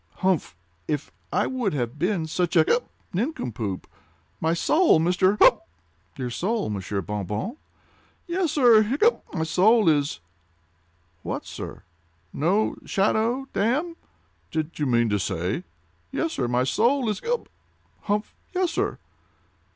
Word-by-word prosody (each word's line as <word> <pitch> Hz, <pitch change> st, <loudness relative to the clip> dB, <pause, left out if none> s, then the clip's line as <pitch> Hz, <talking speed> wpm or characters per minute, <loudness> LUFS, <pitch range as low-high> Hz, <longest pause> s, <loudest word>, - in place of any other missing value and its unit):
—humph! 185 Hz, -, +1 dB, 0.3 s
If 150 Hz, -1 st, -2 dB, 0.2 s
I -, -, +2 dB
would 250 Hz, -8 st, -1 dB
have 125 Hz, +1 st, -3 dB
been 180 Hz, -1 st, 0 dB
such 175 Hz, +2 st, -1 dB
a—hiccup!—nincompoop! 155 Hz, -, -1 dB, 0.5 s
My 160 Hz, +1 st, +1 dB
soul, 315 Hz, -, +4 dB
Mr.—humph!" 185 Hz, +4 st, +4 dB, 0.6 s
"Your 125 Hz, -2 st, -3 dB
soul, 205 Hz, -, -1 dB
Monsieur 100 Hz, 0 st, -3 dB
Bon 105 Hz, +2 st, -3 dB
Bon?" 105 Hz, -, -3 dB, 0.7 s
"Yes, 345 Hz, -3 st, 0 dB
sir—hiccup!—my 240 Hz, -, +3 dB
soul 195 Hz, +7 st, +4 dB
is—" 145 Hz, -, +1 dB, 1.0 s
"What, -, -, -4 dB
sir?" -, -, -8 dB, 0.5 s
"No 185 Hz, +9 st, +1 dB
shadow, 225 Hz, +6 st, +1 dB
damme!" 290 Hz, -, 0 dB, 0.5 s
"Did 160 Hz, +1 st, -3 dB
you 145 Hz, -, +1 dB
mean 120 Hz, -2 st, +3 dB
to 105 Hz, -1 st, +1 dB
say—" 90 Hz, +1 st, -2 dB, 0.5 s
"Yes, 165 Hz, -, -1 dB
sir, 125 Hz, -, -1 dB
my 125 Hz, +1 st, +1 dB
soul 235 Hz, -, +2 dB
is—hiccup!—humph!—yes, 335 Hz, -, -4 dB
sir." -, -, -1 dB
180 Hz, 110 wpm, -25 LUFS, -, 1.0 s, soul